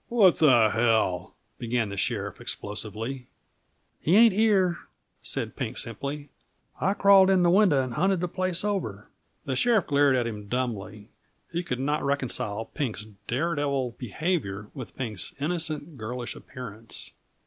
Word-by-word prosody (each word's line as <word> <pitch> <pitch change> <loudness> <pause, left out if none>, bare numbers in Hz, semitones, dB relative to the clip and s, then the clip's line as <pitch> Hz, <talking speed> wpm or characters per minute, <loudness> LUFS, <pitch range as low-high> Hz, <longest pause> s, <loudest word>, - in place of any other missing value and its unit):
"What 210 -7 +5
the 120 -8 +6
hell," 110 -6 +1 0.2
began 115 -2 0
the 100 - -5
sheriff 95 - -2
explosively. 110 +5 -5 0.7
"He 170 - +2
ain't 225 -1 +7
here," 195 -4 +3 0.4
said - - -4
Pink - - -4
simply. 140 +6 -4 0.5
"I 195 +2 +1
crawled 195 -1 +6
in 190 -2 +4
the 175 - +5
window 180 -9 +5
and 130 -2 -5
hunted 190 +7 +2
the 180 - -1
place 185 0 -1
over." 110 - -3 0.3
The 130 - -1
sheriff 220 - +3
glared 140 -2 +4
at 125 -2 +1
him 105 -3 -5
dumbly; 110 -3 -3 0.4
he 170 +1 -1
could 125 -8 -3
not 145 +3 0
reconcile 125 -6 -1
Pink's 110 -4 -4 0.2
daredevil 140 -2 0
behavior 115 - -2
with 130 -5 -8
Pink's 110 -8 -5
innocent, 155 -2 -3
girlish 120 +2 -5
appearance. 115 -3 -6
135 Hz, 140 wpm, -27 LUFS, 115-175 Hz, 0.7 s, ain't